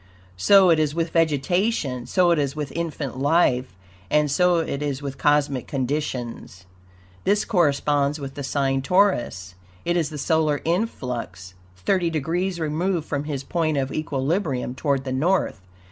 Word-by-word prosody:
So 190 - +6
it 160 - +4
is 150 -1 0
with 165 -1 -1
vegetation, 160 - 0
so 180 -2 +3
it 165 - +3
is 140 0 -1
with 150 -3 -4
infant 150 -6 -4
life, 130 - +2 0.3
and 150 -1 +2
so 180 +3 +3
it 155 -4 -2
is 145 -1 -3
with 140 -1 -5
cosmic 145 -3 +1
conditions. 125 -8 -4 0.6
This 205 +1 +2
corresponds 145 -4 +1
with 135 -1 -6
the 145 - -6
sign 135 -1 0
Taurus. 130 - +1 0.3
It 175 - +1
is 165 -4 +1
the 155 - -7
solar 155 -1 +1
influx, 125 - -3 0.2
thirty 175 - +1
degrees 170 +4 -2
removed 160 +2 -1
from 145 -1 -2
his 140 -3 -4
point 155 0 -1
of 135 -1 -1
equilibrium 145 -2 -1
toward 135 0 -1
the 130 - -4
North. 170 - 0
150 Hz, 150 wpm, -23 LUFS, 135-170 Hz, 0.6 s, So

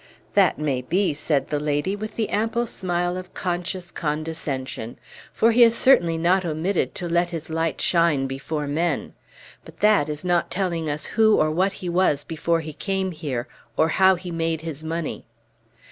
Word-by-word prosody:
"That 195 -4 +4
may 140 -4 -1
be," 180 +7 +1
said 145 -2 -1
the 150 - 0
lady, 150 +6 0
with 215 +1 -6
the 220 -2 -1
ample 225 +3 0
smile 175 -4 -2
of 185 0 -9
conscious 175 0 -3
condescension; 150 -6 -4 0.3
"for 230 - +3
he 240 +2 +4
has 230 -1 +7
certainly 170 -13 +4
not 180 +3 +2
omitted 170 +3 -1
to 175 - -3
let 175 +1 +1
his 165 -2 -5
light 165 0 -1
shine 165 -6 +2
before 135 +3 -3
men. 155 +2 -1 0.5
But - - -15
that 205 -8 +4
is 150 +3 -4
not 175 -1 +1
telling 170 -5 -1
us 150 +1 -2
who 220 -1 +4
or 155 0 +2
what 190 +5 +1
he - - -2
was 170 -5 +2
before 165 +1 -1
he 155 -1 -7
came 190 +2 -2
here, 145 -7 -4 0.3
or 160 - +3
how 190 +3 +5
he 180 0 -7
made 165 -1 -1
his 160 -2 -6
money." 165 0 -4
170 Hz, 175 wpm, -23 LUFS, 150-185 Hz, 0.5 s, has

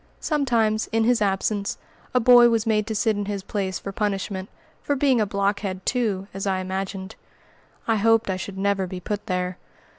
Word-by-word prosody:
Sometimes, 235 -8 +1
in 225 0 +1
his 240 0 +3
absence, 200 0 0 0.3
a 250 - +3
boy 240 0 +7
was 230 -2 +1
made 215 -1 +1
to 220 - -3
sit 215 +1 +2
in 205 0 -2
his 200 -1 -4
place 190 -2 -2
for 195 - -6
punishment, 195 -1 -2 0.3
for 285 - 0
being 260 -4 +3
a 210 - +1
"blockhead" 200 -1 -1
too, 215 -6 0
as 195 +1 -4
I 190 -1 +1
imagined. 190 +1 -4 0.7
I 225 -1 +3
hoped 225 +2 +3
I 190 - 0
should 190 +1 -6
never 195 -1 0
be 180 0 -6
put 205 +3 -4
there. 180 -1 -2
205 Hz, 185 wpm, -24 LUFS, 190-225 Hz, 0.7 s, boy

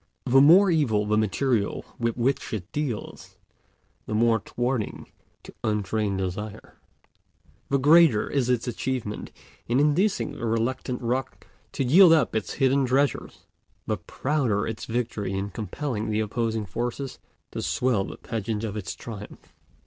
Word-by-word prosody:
The 135 +1 +5
more 180 +7 +7
evil 115 -11 +2
the 105 +1 +1
material 110 +1 0
with 115 -1 -1
which 130 +1 0
it 95 -1 -7
deals, 145 -8 -5 0.7
the 110 - -2
more 115 0 +3
thwarting 120 +1 -3 0.3
to - - -12
untrained 105 -1 -1
desire, 95 +3 -5 0.9
the 140 - +3
greater 145 -5 +5
is 130 -4 0
its 125 -1 +1
achievement 120 -3 -3 0.4
in 120 +3 +2
inducing 170 +8 +2
the 120 - -5
reluctant 120 +3 -1
rock 125 +3 -2 0.3
to - - -1
yield 165 +7 +7
up 155 -7 +2
its 110 - -2
hidden 135 0 +2
treasures, 135 +3 0 0.4
the - - -1
prouder 130 -8 -1
its 110 -1 -5
victory 115 -4 -2
in 100 +1 -3
compelling 110 +3 -4
the 105 0 0
opposing 110 0 -1
forces 120 +7 -4 0.3
to - - -4
swell 125 -6 +1
the - - -8
pageant 110 -1 -4
of 110 -2 -3
its 105 -4 -5
triumph. 105 -3 -10
115 Hz, 140 wpm, -25 LUFS, 105-135 Hz, 0.9 s, more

